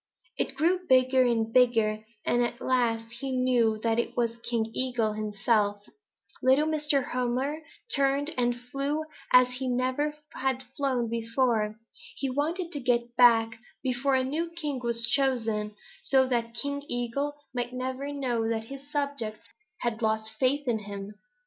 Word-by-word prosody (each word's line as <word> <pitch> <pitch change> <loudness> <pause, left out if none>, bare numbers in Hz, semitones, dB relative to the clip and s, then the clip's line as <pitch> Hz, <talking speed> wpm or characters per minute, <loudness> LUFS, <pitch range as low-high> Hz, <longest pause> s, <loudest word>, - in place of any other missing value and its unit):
It - - -2
grew 340 +6 +2
bigger 255 0 +5
and 225 -1 0
bigger, 225 -4 +3 0.2
and 240 - +2
at 240 0 -3
last 230 -3 0
he 270 0 -3
knew 245 -4 +2
that 230 0 +2
it 235 - -2
was 235 -1 0
King 230 -1 -2
Eagle 245 -4 0
himself. 210 -1 0 0.6
Little 265 +4 +4
Mr. 300 -3 +1
Hummer 255 +5 -1 0.3
turned 280 +2 +2
and 245 -1 +1
flew 275 +5 -2 0.3
as 250 0 +7
he 265 - -2
never 255 +4 0 0.2
had 265 0 -1
flown 260 -4 0
before. 230 -1 0 0.4
He 270 -2 -2
wanted 330 +6 -1
to 290 - -3
get 240 -2 0
back 230 -2 +5 0.2
before 265 +1 +1
a 260 - +3
new 315 +6 -2
king 300 -5 -3
was 235 -1 +1
chosen, 225 -5 +1 0.3
so 265 -1 +3
that 235 -2 -1
King 280 +3 -2
Eagle 245 +4 -2 0.2
might 245 -1 -2
never 260 +2 -4
know 245 -5 -1
that 225 -1 -1
his 275 +3 -10
subjects 280 -7 -3 0.3
had 235 -1 -1
lost 220 0 0
faith 275 +2 +1
in 230 -3 +1
him. 200 0 -7
250 Hz, 150 wpm, -28 LUFS, 230-275 Hz, 0.6 s, as